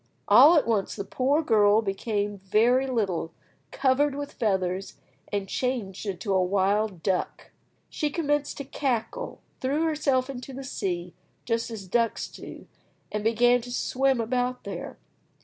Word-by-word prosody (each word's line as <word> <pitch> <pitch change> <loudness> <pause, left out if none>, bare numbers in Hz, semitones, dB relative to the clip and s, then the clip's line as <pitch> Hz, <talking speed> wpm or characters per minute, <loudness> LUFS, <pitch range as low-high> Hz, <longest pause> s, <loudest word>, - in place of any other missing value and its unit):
All 320 +5 +8
at 295 - +3
once 215 -4 0
the 200 - -5
poor 275 +9 +1
girl 215 -4 +4
became 205 0 -2
very 235 +7 +3
little, 190 -9 -1 0.3
covered 275 +1 +2
with 285 0 -5
feathers, 190 -3 -1 0.4
and 200 -2 -2
changed 220 -5 -3
into 195 +1 -2
a 190 - +3
wild 195 0 0
duck. 190 -2 -2 0.4
She 300 - -2
commenced 295 -2 -1
to 280 - -4
cackle, 255 -5 -3 0.2
threw 280 +5 0
herself 285 -5 +1
into 265 0 -7
the 270 +1 -7
sea, 180 -8 -3 0.3
just 230 0 -1
as 220 -4 -7
ducks 230 +4 0
do, - - -10 0.5
and 210 0 -2
began 240 +2 +4
to 245 +1 -9
swim 265 +1 +1
about 250 +2 -1
there. - - -6
230 Hz, 145 wpm, -26 LUFS, 200-265 Hz, 0.5 s, All